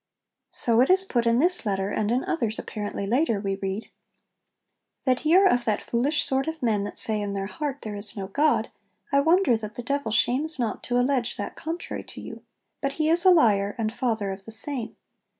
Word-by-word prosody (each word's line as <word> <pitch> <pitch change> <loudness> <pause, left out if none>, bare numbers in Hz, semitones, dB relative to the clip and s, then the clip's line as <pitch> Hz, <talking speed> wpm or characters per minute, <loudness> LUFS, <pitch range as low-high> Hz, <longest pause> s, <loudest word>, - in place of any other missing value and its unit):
So 235 0 +1
it 260 - +2
is 380 +1 +5
put 240 -9 -1
in 230 0 +3
this 355 +6 +5
letter; 195 -2 -2
and 210 0 -1
in 250 +2 0
others, 230 -10 -1
apparently 205 -2 -5
later, 230 0 +1
we 195 -1 -3
read 195 +2 -5 1.1
'That 255 -2 +1
ye 315 +2 +3
are 390 +1 +6
of 245 -10 +3
that 215 -2 -1
foolish 275 +6 0
sort 270 +1 -1
of 320 -3 -5
men 215 -4 +1
that 205 - -7
say 215 -1 +6
in 200 -1 -4
their 195 -1 -3
heart, 285 +6 -5
"There 215 -3 -5
is 205 +1 -1
no 195 - -4
God," 290 +10 0 0.4
I 280 - +4
wonder 325 -2 +3
that 215 -1 -6
the 245 - -6
Devil 280 -1 -2
shames 270 +8 +2
not 235 -4 -3
to 245 - -1
allege 250 -1 0
that 205 - -5
contrary 330 +2 -5
[to] - - -10
you; - - -9 0.4
but 275 -1 -2
he 310 +1 0
is 340 +2 +3
a - - +8
liar, 205 - +3
and 220 -1 -2
father 225 -6 -2
of 190 0 -9
the 225 - -9
same. 235 +1 -2
240 Hz, 215 wpm, -25 LUFS, 210-290 Hz, 1.1 s, a